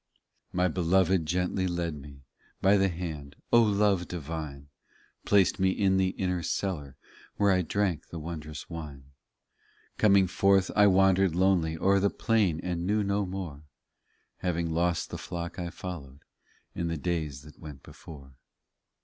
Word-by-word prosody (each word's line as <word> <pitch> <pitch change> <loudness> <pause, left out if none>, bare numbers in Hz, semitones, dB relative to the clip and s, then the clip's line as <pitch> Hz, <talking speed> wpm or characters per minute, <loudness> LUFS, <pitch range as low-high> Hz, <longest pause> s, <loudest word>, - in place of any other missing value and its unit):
26 - - -9
My 90 0 +3
Beloved 90 0 +2
gently 90 +2 0
led 85 -2 -2
me 70 -1 -12 0.4
By 95 +2 +4
the 95 -1 +3
hand, 80 -5 -6 0.2
O 120 - +8
love 100 -4 +2
divine! 75 -4 -6 0.6
Placed 100 -1 +3
me 95 0 +3
in 95 0 +2
the 95 -1 +2
inner 90 -2 -1
cellar 75 -6 -3 0.4
Where 100 -1 +3
I 90 -1 +3
drank 90 -1 -1
the 85 - -8
wondrous 75 -2 -7
wine. 70 -5 -9 0.9
Coming 100 -3 +5
forth 95 +1 +2
I 105 0 +6
wandered 95 -2 +4
lonely 90 -3 +2
O 95 - -2
er 100 0 +5
the 100 +1 +2
plain, 105 -10 +1
and 90 -1 -2
knew 105 +1 +2
no 100 0 0
more, 90 -6 -6 0.8
Having 85 -2 -2
lost 85 +1 0
the - - -5
flock 85 +1 -6
I 85 -1 -3
followed 75 -7 -8 0.5
In 85 - -3
the 85 -1 -2
days 75 -5 -3
that 75 - -15
went 75 -4 -10
before. 70 -4 -13
90 Hz, 155 wpm, -28 LUFS, 80-95 Hz, 0.9 s, O